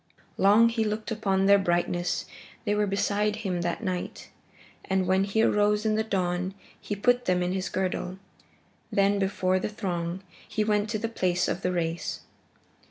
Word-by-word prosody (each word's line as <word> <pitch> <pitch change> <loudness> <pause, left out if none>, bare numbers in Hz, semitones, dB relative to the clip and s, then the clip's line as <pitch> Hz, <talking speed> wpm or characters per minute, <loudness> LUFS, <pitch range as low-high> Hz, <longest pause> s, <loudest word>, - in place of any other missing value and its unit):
Long 210 +4 +6
he 230 -1 0
looked 215 +1 -3
upon 195 -3 +1
their 200 0 +6
brightness. 175 -1 0 0.4
They 205 - +1
were 210 0 +1
beside 205 +1 0
him 190 -5 -2
that 175 +6 -2
night, 185 -3 -4 0.6
and 190 -1 +1
when 190 +1 +2
he 220 +3 +1
arose 210 0 +2
in 215 - +2
the 220 +1 +1
dawn 185 -2 -1 0.3
he 205 - -3
put 245 +4 +2
them 180 -1 +2
in 180 - -1
his 190 0 -2
girdle. 185 0 -2 0.7
Then, 200 0 +3
before 185 -1 +1
the 185 - -2
throng, 180 -3 -3 0.2
he 215 - 0
went 210 0 +1
to 215 - -1
the 225 +2 -2
place 180 -5 0
of 185 - -2
the 180 - 0
race. 170 -1 -2
195 Hz, 170 wpm, -27 LUFS, 180-210 Hz, 0.7 s, Long